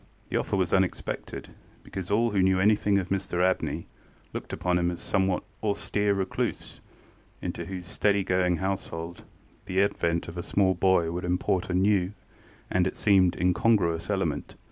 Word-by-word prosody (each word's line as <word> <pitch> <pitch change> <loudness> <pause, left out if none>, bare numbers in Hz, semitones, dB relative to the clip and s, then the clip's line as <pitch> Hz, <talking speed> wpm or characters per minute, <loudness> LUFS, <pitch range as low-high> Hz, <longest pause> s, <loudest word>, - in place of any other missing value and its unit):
The - - 0
offer - - -1
was 95 -2 0
unexpected, 95 -1 -1 0.3
because 95 -2 -6
all 115 +3 +2
who 100 -2 +2
knew 95 0 +3
anything 105 0 +3
of 95 -2 -2
Mr 95 -2 0
Abney 95 - -1 0.5
looked - - -6
upon 90 -1 0
him 85 0 +1
as 90 - -4
a - - -12
somewhat 95 -2 +1 0.2
austere 105 -1 0
recluse, 95 -1 -3 0.6
into - - -4
whose 95 -2 -6
steady 100 +2 +1
going 90 -1 +1
household 85 -3 -4 0.4
the 95 +1 0
advent 85 -4 0
of 85 +1 -6
a - - -1
small 95 +1 +2
boy 85 -2 +2
would 90 +1 -4
import 90 +1 0
a 90 - 0
new 95 0 +2 0.6
and, 90 0 +3
it - - -5
seemed, 95 -4 +4
incongruous 90 -2 +2
element. - - -1
95 Hz, 165 wpm, -27 LUFS, 90-100 Hz, 0.6 s, seemed